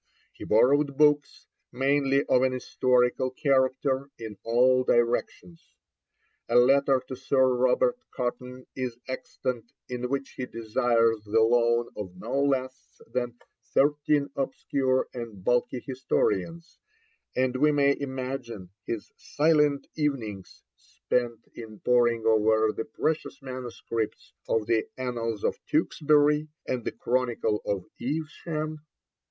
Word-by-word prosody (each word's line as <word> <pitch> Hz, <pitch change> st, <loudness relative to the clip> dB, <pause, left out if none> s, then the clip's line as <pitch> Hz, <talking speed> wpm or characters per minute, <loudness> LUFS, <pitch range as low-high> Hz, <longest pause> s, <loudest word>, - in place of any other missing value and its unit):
He -, -, -9 dB
borrowed 140 Hz, +5 st, +3 dB
books, 150 Hz, -1 st, +2 dB, 0.3 s
mainly 140 Hz, +1 st, +2 dB
of 125 Hz, -, +3 dB
an 130 Hz, 0 st, +2 dB
historical 125 Hz, 0 st, +1 dB
character, 130 Hz, 0 st, +1 dB
in 110 Hz, -2 st, -7 dB
all 130 Hz, +2 st, +3 dB
directions. 120 Hz, -8 st, -1 dB, 0.7 s
A 120 Hz, -, 0 dB
letter 135 Hz, +1 st, +4 dB
to 130 Hz, -, -5 dB
Sir 130 Hz, 0 st, +2 dB
Robert 130 Hz, -, +2 dB
Cotton 125 Hz, 0 st, -5 dB
is 125 Hz, -3 st, -4 dB
extant 125 Hz, -2 st, -5 dB, 0.2 s
in 125 Hz, 0 st, -3 dB
which 140 Hz, 0 st, -3 dB
he 125 Hz, -, -3 dB
desires 115 Hz, -1 st, +1 dB
the 110 Hz, +2 st, +2 dB
loan 120 Hz, +1 st, +3 dB
of 95 Hz, -4 st, -7 dB
no 120 Hz, +9 st, -2 dB
less 130 Hz, -2 st, -2 dB
than 120 Hz, -1 st, -2 dB, 0.4 s
thirteen 145 Hz, 0 st, +2 dB
obscure 135 Hz, -1 st, 0 dB
and 115 Hz, -6 st, -7 dB
bulky 125 Hz, +3 st, +1 dB
historians, 130 Hz, -, -2 dB, 0.6 s
and 130 Hz, 0 st, +1 dB
we 150 Hz, +3 st, +4 dB
may 140 Hz, -1 st, +3 dB
imagine 130 Hz, -8 st, -5 dB, 0.2 s
his 115 Hz, -3 st, -4 dB
silent 150 Hz, -2 st, +2 dB
evenings 115 Hz, -, -3 dB
spent 120 Hz, -2 st, -3 dB
in 110 Hz, -2 st, -10 dB
poring 120 Hz, -2 st, +2 dB
over 110 Hz, 0 st, +3 dB
the 115 Hz, -, -4 dB
precious 155 Hz, 0 st, -2 dB
manuscripts 120 Hz, -4 st, -5 dB, 0.2 s
of 110 Hz, -1 st, +1 dB
the 115 Hz, 0 st, +2 dB
Annals 115 Hz, -4 st, -3 dB
of -, -, -1 dB
Tewkesbury 150 Hz, 0 st, +2 dB, 0.2 s
and 125 Hz, -2 st, -2 dB
the -, -, -1 dB
Chronicle 120 Hz, -3 st, -1 dB
of 100 Hz, -3 st, -1 dB, 0.2 s
Evesham. 155 Hz, +2 st, -4 dB
125 Hz, 120 wpm, -27 LUFS, 115-140 Hz, 0.7 s, letter